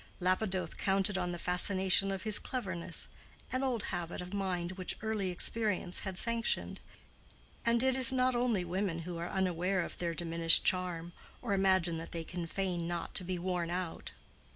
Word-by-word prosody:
Lapidoth 185 +1 -2
counted 195 0 0
on 180 -2 -2
the 175 - -5
fascination 190 +2 +4
of 195 -1 -4
his 215 -2 +6
cleverness—an 195 +3 -3
old 250 -5 -2
habit 175 -1 -5
of 180 +2 -8
mind 185 -3 -3
which 185 -1 -4
early 215 -4 -2
experience 185 0 +2
had 190 -2 -6
sanctioned: 230 +1 -2 0.9
and 235 +1 +2
it 260 -1 +2
is 260 -2 +10
not 255 0 +1
only 240 -6 0
women 175 -2 -3
who 175 0 -7
are 170 - -5
unaware 185 0 -1
of - - -7
their 170 -1 -3
diminished 165 0 +5
charm, 175 -2 -2 0.3
or 230 -5 -3
imagine 190 -4 +1
that 165 - -9
they 165 -1 -4
can 175 0 -6
feign 180 -2 -3
not 175 -1 -5
to - - 0
be 180 0 -4
worn 175 -1 -3
out. 175 -1 -5
185 Hz, 170 wpm, -31 LUFS, 175-200 Hz, 0.9 s, is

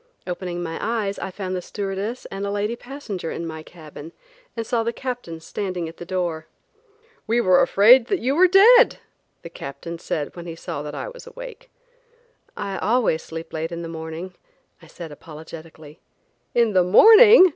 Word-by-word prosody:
Opening 175 -1 -4
my 165 -1 -5
eyes 215 -3 -2
I - - -4
found 185 -1 -5
the 180 - -3
stewardess 200 +5 -4
and 195 0 -5
a 200 - -2
lady 205 +3 -1
passenger 240 - -7
in 170 - -5
my 160 -1 -6
cabin 155 -1 -12 0.4
and 230 - -2
saw 235 +1 0
the 230 +1 -1
Captain 245 -10 -6
standing 180 0 -4
at 165 - -11
the 175 - -9
door. 175 -4 -2 0.8
"We 230 +2 +2
were 185 -5 +4
afraid 230 +5 +6
that 395 - +1
you 265 -3 0
were 365 +3 +6
dead," 450 +7 +7 0.5
the 170 - -8
Captain 165 +4 -8
said 150 -3 -4
when 175 -1 -8
he 165 - -6
saw 145 -3 -6
that 150 0 -7
I - - -5
was - - -12
awake. - - -10 0.9
"I 195 -1 -4
always 215 -7 +1
sleep 165 0 -9
late 160 +1 -3
in 170 0 -5
the - - -5
morning," 165 +2 -7 0.5
I - - -16
said 170 -3 -9
apologetically. 155 0 -12 0.6
"In 235 -3 +3
the 185 -1 +4
morning!" 425 - +8
185 Hz, 180 wpm, -22 LUFS, 165-235 Hz, 0.9 s, morning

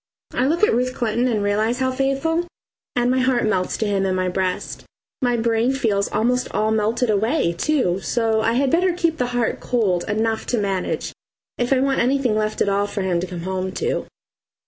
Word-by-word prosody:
I 255 - +1
look 335 +7 0
at - - +5
Ruth 250 +2 0
Clinton 235 +1 0
and 215 -4 0
realise 215 +4 +1
how 260 0 0
faithful, 275 +6 0 0.5
and 245 0 +2
my 260 - +2
heart 255 -2 +2
melts 190 -4 0
to 220 - -1
him 200 -2 0
in 190 -1 0
my 185 0 0
breast 185 0 -3 0.4
my 245 -2 +2
brain 230 +2 +1
feels 210 -7 0
almost 245 +4 0
all 215 +1 +1
melted 220 +2 +1
away, 215 - +1
too, 195 - 0
so 225 +1 0
I 225 - +1
had 265 +2 +1
better 360 +1 +3
keep 335 -2 0
the 250 - 0
heart 235 -2 0
cold 200 -8 0
enough 220 +1 -1
to 245 - 0
manage, 195 -3 -2 0.5
if 245 +1 0
I 265 -1 +4
want 270 0 +1
anything 255 -2 +2
left 215 0 -1
at - - -3
all 200 +1 +1
for 205 -1 -3
him 180 -2 0
to 180 - -3
come 175 -2 -6
home 185 +1 -3
to. 460 - -2
225 Hz, 205 wpm, -21 LUFS, 200-255 Hz, 0.5 s, at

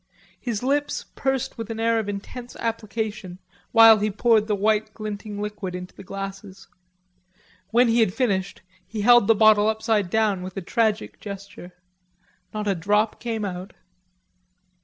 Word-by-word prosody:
His 235 -2 -3
lips 285 +2 0
pursed 265 -3 -2
with 225 - -5
an 225 -1 -5
air 230 0 +2
of 210 -2 -3
intense 240 +5 -7
application, 215 -4 -4 0.3
while 225 -2 +8
he 210 +1 0
poured 215 +1 +2
the 210 - +1
white 215 +1 +1
glinting 210 -1 -6
liquid 205 -3 -5
into 180 0 -8
the - - -12
glasses. 195 0 -8 1.0
When 240 +3 +4
he 230 +1 +3
had 220 -5 +3
finished 195 -5 -1 0.2
he 220 -2 -4
held 240 -1 +6
the 225 - +5
bottle 215 -1 +5
upside 220 -3 0
down 210 -2 +1
with 185 +1 -8
a - - -2
tragic 220 +2 -1
gesture; 200 -3 -9 0.8
not 210 -1 -4
a 200 - +3
drop 210 +5 0
came 225 -3 -3
out. 185 0 -6
215 Hz, 155 wpm, -24 LUFS, 200-225 Hz, 1.0 s, while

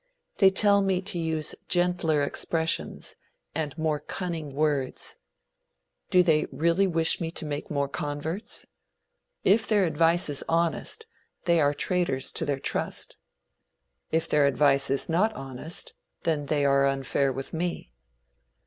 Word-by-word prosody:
They 195 - +7
tell 200 +1 +4
me 190 -2 +1
to 190 -1 -2
use 160 -1 -1
gentler 175 -4 +2
expressions, 160 +3 -1 0.4
and 155 -1 -3
more 155 -2 0
cunning 160 -2 -5
words. 145 -3 0 0.9
Do 180 -1 +5
they 155 -3 +3
really 170 +4 +2
wish 165 -2 +3
me 165 - -1
to 165 0 -4
make 145 -1 -4
more 140 -2 0
converts? 150 +6 -3 0.8
If 215 +4 +4
their 205 -3 +3
advice 165 +2 +3
is 145 -2 -1
honest, 170 - 0 0.4
they 170 -2 +4
are 145 0 +2
traitors 170 -8 0
to 165 - -2
their 145 -2 -1
trust. - - -3 0.9
If 160 +1 +1
their 150 -3 +3
advice 140 +1 +3
is 135 0 +1
not 190 +7 +2
honest, 135 +3 -6 0.3
then 150 -3 0
they 145 -1 +1
are 140 0 +4
unfair 135 0 0
with 135 +1 -6
me. 170 - -3
160 Hz, 140 wpm, -27 LUFS, 145-175 Hz, 0.9 s, They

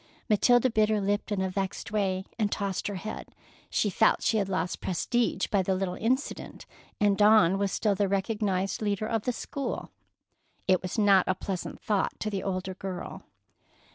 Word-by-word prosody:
Matilda 245 +3 +4
bit 215 -1 +3
her 215 -1 +2
lip 205 +1 -1
in 200 -2 0
a 190 - -1
vexed 195 +2 -3
way 190 -3 0
and 210 -2 +1
tossed 195 -2 -2
her 205 - -3
head. 215 +4 -7 0.3
She 205 - +1
felt 220 - +3
she 225 - +2
had 195 -2 0
lost 185 -2 -2
prestige 230 +6 0
by 200 - +1
the 190 +1 0
little 185 -1 -2
incident, 255 - -2 0.3
and 205 -1 +3
Dawn 205 -3 +5
was 200 -1 0
still 210 0 +1
the 200 0 +1
recognized 195 -1 -1
leader 205 0 -1
of 225 -1 -1
the 250 - +2
school. 275 +3 -5 0.8
It 185 -2 +4
was 185 +3 -5
not 200 -3 +5
a 185 - +2
pleasant 185 -1 -5
thought 205 -3 -1
to 215 - -2
the 195 -2 -2
older 190 -1 -3
girl. 185 -1 -6
200 Hz, 180 wpm, -28 LUFS, 190-215 Hz, 0.8 s, Dawn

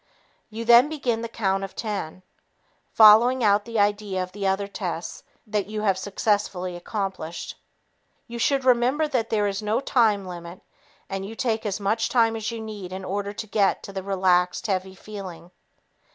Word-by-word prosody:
You 225 +1 -6
then 240 +4 +7
begin 250 -7 -1
the 230 - -3
count 195 -4 -1
of 195 - -7
ten, 195 -5 -4 0.7
following 230 +4 +7
out 205 -1 +3
the 230 -1 -4
idea 205 -2 +1
of 185 - -8
the 200 0 -3
other 195 +1 0
tests 180 -4 -5 0.2
you 210 0 -2
have 200 -3 +2
successfully 190 -2 -1
accomplished. 185 -3 -5 0.7
You 235 0 -7
should 270 +2 +1
remember 255 +5 +3
that 245 -6 -1
there 210 -2 +1
is 200 0 -2
no 215 +1 0
time 225 -7 +2
limit 175 0 -9 0.5
and 195 0 -4
you 210 +3 -7
take 225 -2 -1
as 200 0 -2
much 215 +3 0
time 225 -2 +3
as 220 0 -3
you 230 -1 -5
need 210 -4 -7
in 190 0 -6
order 200 +2 -3
to 215 - -6
get 205 -2 +1
the 195 -1 -6
relaxed, 185 -2 +1
heavy 190 -2 -2
feeling. 185 -5 -9
205 Hz, 165 wpm, -24 LUFS, 190-225 Hz, 0.7 s, then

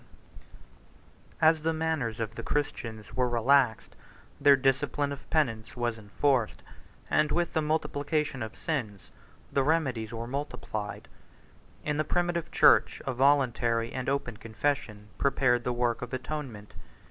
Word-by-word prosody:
] - - -28
As 160 -1 0
the 165 +1 0
manners 155 -8 -1
of 110 -1 -3
the - - -6
Christians 115 -7 -3
were 125 -1 +1
relaxed, 120 0 +2 0.4
their 140 -1 +7
discipline 135 +2 +1
of 140 -1 -8
penance 115 -9 +1
22 - - -13
was 120 -1 -1
enforced; 115 +3 0 0.5
and 150 0 +3
with 175 0 0
the 160 - +2
multiplication 150 -2 -1
of 110 0 -5
sins, 120 - -4 0.4
the 140 - +3
remedies 130 -7 0
were 115 0 -5
multiplied. 125 -5 -5 0.8
In 150 0 0
the 155 - +2
primitive 175 +1 -1
church, - - +5
a 135 - -1
voluntary 120 -4 +2
and 130 0 -2
open 130 -5 -2
confession 110 -2 -3
prepared 125 -3 +2
the 125 - -1
work 120 -1 0
of 125 - -6
atonement. 125 -5 -6
130 Hz, 140 wpm, -29 LUFS, 115-145 Hz, 0.8 s, their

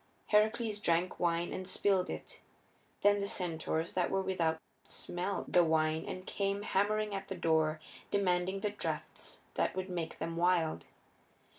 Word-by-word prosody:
Heracles 215 0 +3
drank 175 -1 +1
wine 170 0 +1
and 185 - -4
spilled 190 -2 +2
it. - - -7 0.6
Then 205 0 +5
the 200 - -1
centaurs 165 -3 -1
that 180 -2 +1
were 195 0 +1
without 165 -4 0 0.2
smelt 180 +3 -4
the 175 - +7
wine 160 -1 +2
and 185 0 -5
came 200 0 -1
hammering 210 +1 +1
at 195 0 -4
the - - -4
door, 160 -1 +2 0.3
demanding 190 0 +1
the 210 -1 0
drafts 205 - -5
that - - 0
would 185 0 -3
make 170 -3 -3
them 165 +1 -4
wild. 170 -2 +2
185 Hz, 150 wpm, -33 LUFS, 165-200 Hz, 0.6 s, the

